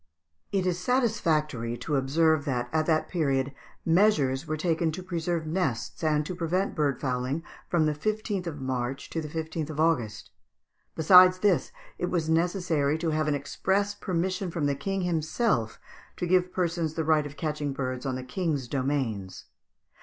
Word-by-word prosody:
] 80 Hz, 0 st, -51 dB
It 195 Hz, -2 st, +1 dB
is 180 Hz, -1 st, 0 dB
satisfactory 160 Hz, -, 0 dB
to 150 Hz, -, -2 dB
observe 155 Hz, +3 st, +2 dB
that 120 Hz, -4 st, -1 dB
at 155 Hz, -1 st, +1 dB
that 155 Hz, -2 st, +2 dB
period 140 Hz, -5 st, 0 dB, 0.3 s
measures 160 Hz, -6 st, +3 dB
were 155 Hz, -, -2 dB
taken 165 Hz, 0 st, +1 dB
to 185 Hz, +3 st, -6 dB
preserve 170 Hz, -2 st, -2 dB
nests 155 Hz, -, -2 dB
and 150 Hz, -1 st, +2 dB
to 180 Hz, -, -4 dB
prevent 180 Hz, +3 st, -1 dB
bird 145 Hz, -4 st, 0 dB
fowling 130 Hz, +3 st, -2 dB, 0.3 s
from 165 Hz, -3 st, +3 dB
the 155 Hz, -, +2 dB
15th 205 Hz, +3 st, -2 dB
of 150 Hz, -3 st, -5 dB
March 130 Hz, 0 st, -3 dB
to 165 Hz, -, -2 dB
the 155 Hz, -, -5 dB
15th 160 Hz, 0 st, -4 dB
of 155 Hz, -1 st, -6 dB
August. 125 Hz, -10 st, 0 dB, 0.6 s
Besides 185 Hz, +3 st, +7 dB
this, 195 Hz, -, +2 dB, 0.3 s
it -, -, 0 dB
was 165 Hz, -3 st, 0 dB
necessary 165 Hz, -3 st, +1 dB
to 160 Hz, 0 st, -1 dB
have 155 Hz, 0 st, 0 dB
an 150 Hz, -, +2 dB
express 195 Hz, +8 st, 0 dB
permission 185 Hz, 0 st, -2 dB
from 165 Hz, -3 st, -2 dB
the 140 Hz, -, +2 dB
King 195 Hz, +8 st, -2 dB
himself 160 Hz, -, 0 dB, 0.4 s
to -, -, -2 dB
give 180 Hz, 0 st, +2 dB
persons 170 Hz, -3 st, -1 dB
the 160 Hz, -, 0 dB
right 155 Hz, -1 st, +3 dB
of 145 Hz, -, -12 dB
catching 150 Hz, -2 st, -2 dB
birds 130 Hz, -2 st, -3 dB
on 130 Hz, -2 st, -2 dB
the 130 Hz, -, -5 dB
King's 145 Hz, -1 st, -2 dB
domains. 130 Hz, -8 st, -2 dB
155 Hz, 170 wpm, -27 LUFS, 140-180 Hz, 0.6 s, Besides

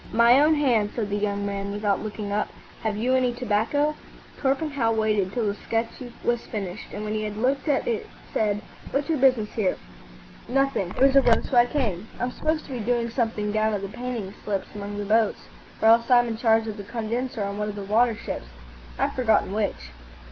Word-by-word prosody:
"My 235 Hz, +3 st, +6 dB
own 305 Hz, +2 st, +5 dB
hand," 240 Hz, -8 st, +2 dB
said 210 Hz, -4 st, -2 dB
the -, -, +1 dB
young 205 Hz, -1 st, -1 dB
man, 200 Hz, 0 st, -3 dB
without 205 Hz, -1 st, 0 dB
looking 210 Hz, -1 st, -5 dB
up. 210 Hz, +1 st, 0 dB, 0.3 s
"Have 215 Hz, -2 st, -1 dB
you 245 Hz, +4 st, +1 dB
any 255 Hz, -2 st, +2 dB
tobacco?" 250 Hz, +5 st, +1 dB, 0.5 s
Torpenhow 275 Hz, -3 st, +1 dB
waited 215 Hz, -4 st, +1 dB
till 235 Hz, +1 st, -1 dB
the 200 Hz, -, +1 dB
sketch 225 Hz, +2 st, -2 dB, 0.3 s
was 240 Hz, 0 st, +1 dB
finished, 200 Hz, -2 st, -5 dB
and 210 Hz, -, -5 dB
when 215 Hz, 0 st, -3 dB
he 215 Hz, -, -1 dB
had 210 Hz, -1 st, -4 dB
looked 265 Hz, +6 st, 0 dB
at 285 Hz, -2 st, +1 dB
it 230 Hz, -2 st, -2 dB, 0.2 s
said, 210 Hz, -1 st, 0 dB, 0.3 s
"What's 280 Hz, +3 st, -1 dB
your 315 Hz, -3 st, +1 dB
business 255 Hz, -5 st, +3 dB
here?" 200 Hz, -5 st, 0 dB, 0.7 s
"Nothing; 270 Hz, -8 st, +1 dB
there 260 Hz, -, +6 dB
was 275 Hz, 0 st, +4 dB
a 275 Hz, -, +8 dB
row, 235 Hz, -3 st, +3 dB
so 270 Hz, -, -3 dB
I 240 Hz, 0 st, +6 dB
came. 220 Hz, -9 st, -2 dB
I'm 245 Hz, +1 st, -1 dB
supposed 310 Hz, +4 st, -1 dB
to -, -, -11 dB
be 250 Hz, -, -3 dB
doing 235 Hz, +1 st, 0 dB
something 225 Hz, -4 st, -1 dB
down 215 Hz, 0 st, +1 dB
at 200 Hz, -, -4 dB
the 195 Hz, -, -4 dB
painting 240 Hz, -4 st, -5 dB
slips 200 Hz, -2 st, -3 dB
among 205 Hz, 0 st, -6 dB
the 205 Hz, -, -3 dB
boats, 220 Hz, +1 st, +2 dB, 0.4 s
or 220 Hz, -, +7 dB
else 230 Hz, +2 st, +5 dB
I'm 240 Hz, -1 st, +6 dB
in 225 Hz, -, -2 dB
charge 225 Hz, -1 st, +3 dB
of 215 Hz, -1 st, -5 dB
the 205 Hz, -, -6 dB
condenser 230 Hz, +2 st, -3 dB
on 200 Hz, +1 st, -4 dB
one 210 Hz, 0 st, -1 dB
of 205 Hz, -, -5 dB
the 200 Hz, -, -5 dB
water 225 Hz, +3 st, +3 dB
ships. -, -, -6 dB, 0.5 s
I've -, -, 0 dB
forgotten 225 Hz, -6 st, +2 dB
which." 205 Hz, -, -2 dB
225 Hz, 215 wpm, -25 LUFS, 205-250 Hz, 0.7 s, a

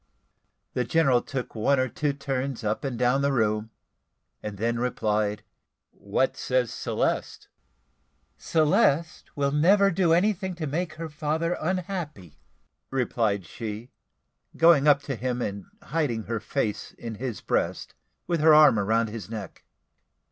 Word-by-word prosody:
The 125 Hz, -, 0 dB
general 130 Hz, -1 st, +3 dB
took 125 Hz, -1 st, -5 dB
one 130 Hz, +5 st, +2 dB
or 130 Hz, -, +2 dB
two 145 Hz, +4 st, -1 dB
turns 135 Hz, -3 st, -3 dB
up 105 Hz, 0 st, -1 dB
and 135 Hz, -4 st, -3 dB
down 125 Hz, +3 st, +2 dB
the 140 Hz, 0 st, +2 dB
room, 110 Hz, -3 st, 0 dB, 0.7 s
and 105 Hz, -1 st, -6 dB
then 115 Hz, +3 st, -1 dB
replied 105 Hz, -3 st, -1 dB, 0.5 s
"What -, -, -1 dB
says 125 Hz, -3 st, 0 dB
Celeste?" -, -, -2 dB, 0.9 s
"Celeste 160 Hz, -1 st, +1 dB
will 140 Hz, -1 st, +1 dB
never 195 Hz, +7 st, +4 dB
do 175 Hz, -1 st, +2 dB
anything 190 Hz, +1 st, +1 dB
to 165 Hz, -2 st, -4 dB
make 160 Hz, +3 st, -2 dB
her 165 Hz, +1 st, -6 dB
father 155 Hz, +3 st, -1 dB
unhappy," 170 Hz, -, -4 dB, 0.5 s
replied 115 Hz, -7 st, 0 dB
she, 110 Hz, +6 st, -7 dB, 0.7 s
going 165 Hz, -3 st, +6 dB
up 140 Hz, -1 st, +5 dB
to 135 Hz, -, -3 dB
him 125 Hz, +1 st, -2 dB
and 100 Hz, -4 st, -4 dB, 0.2 s
hiding 135 Hz, -7 st, -1 dB
her 115 Hz, 0 st, -3 dB
face 110 Hz, -1 st, -3 dB
in 115 Hz, -1 st, -7 dB
his 125 Hz, -5 st, -3 dB
breast, -, -, -2 dB, 0.3 s
with 170 Hz, -2 st, 0 dB
her 155 Hz, 0 st, +7 dB
arm 150 Hz, -8 st, +7 dB
round 110 Hz, +3 st, +1 dB
his 105 Hz, -4 st, -7 dB
neck. 105 Hz, -5 st, -8 dB
135 Hz, 140 wpm, -26 LUFS, 115-155 Hz, 0.9 s, her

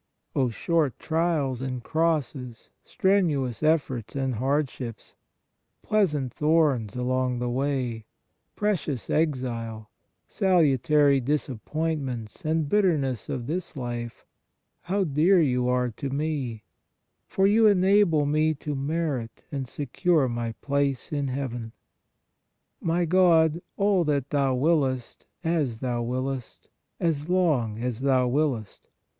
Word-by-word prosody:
O 130 Hz, -3 st, +2 dB
short 150 Hz, +2 st, 0 dB
trials 155 Hz, -6 st, 0 dB
and 130 Hz, -2 st, -4 dB
crosses, 145 Hz, -7 st, -2 dB
strenuous 170 Hz, -, +1 dB
efforts 145 Hz, -8 st, 0 dB
and 135 Hz, -2 st, -1 dB
hardships, 130 Hz, -3 st, -2 dB, 0.7 s
pleas 200 Hz, -7 st, +2 dB
ant 130 Hz, -4 st, -3 dB
thorns 150 Hz, -9 st, +2 dB
along 125 Hz, 0 st, 0 dB
the 120 Hz, 0 st, -2 dB
way, 125 Hz, -4 st, -2 dB, 0.5 s
precious 175 Hz, -, -1 dB
exile, 120 Hz, -8 st, -2 dB, 0.4 s
salutary 150 Hz, -, +3 dB
disappointments 135 Hz, -2 st, -3 dB
and 155 Hz, -1 st, 0 dB
bitterness 145 Hz, -, +1 dB
of 120 Hz, -, -3 dB
this 170 Hz, +5 st, -4 dB
life, 120 Hz, -2 st, -5 dB, 0.6 s
how 195 Hz, +2 st, 0 dB
dear 170 Hz, +4 st, +3 dB
you 125 Hz, -5 st, +2 dB
are 125 Hz, -1 st, +1 dB
to 135 Hz, +5 st, -5 dB
me, 135 Hz, -6 st, -3 dB, 0.6 s
for 195 Hz, -, +1 dB
you 215 Hz, +2 st, +5 dB
enable 190 Hz, -5 st, +4 dB
me 155 Hz, +2 st, +2 dB
to 150 Hz, +1 st, -5 dB
merit 140 Hz, -4 st, -3 dB
and 135 Hz, -3 st, -3 dB
secure 145 Hz, +3 st, +1 dB
my 120 Hz, -1 st, -3 dB
place 140 Hz, +1 st, -1 dB
in 145 Hz, -2 st, -1 dB
Heaven! 120 Hz, -4 st, -4 dB, 1.1 s
My 170 Hz, +1 st, +1 dB
God, 165 Hz, -2 st, +4 dB, 0.2 s
all 200 Hz, -3 st, +3 dB
that 140 Hz, -3 st, -1 dB
Thou 140 Hz, -3 st, +2 dB
wiliest, 135 Hz, -3 st, 0 dB, 0.2 s
as 150 Hz, -9 st, 0 dB
Thou 120 Hz, -2 st, -2 dB
wiliest, 130 Hz, +1 st, -4 dB, 0.3 s
as 160 Hz, -2 st, -1 dB
long 150 Hz, -13 st, +1 dB
as 120 Hz, 0 st, -3 dB
Thou 130 Hz, -2 st, +2 dB
wiliest 125 Hz, -6 st, -1 dB
140 Hz, 115 wpm, -26 LUFS, 125-160 Hz, 1.1 s, you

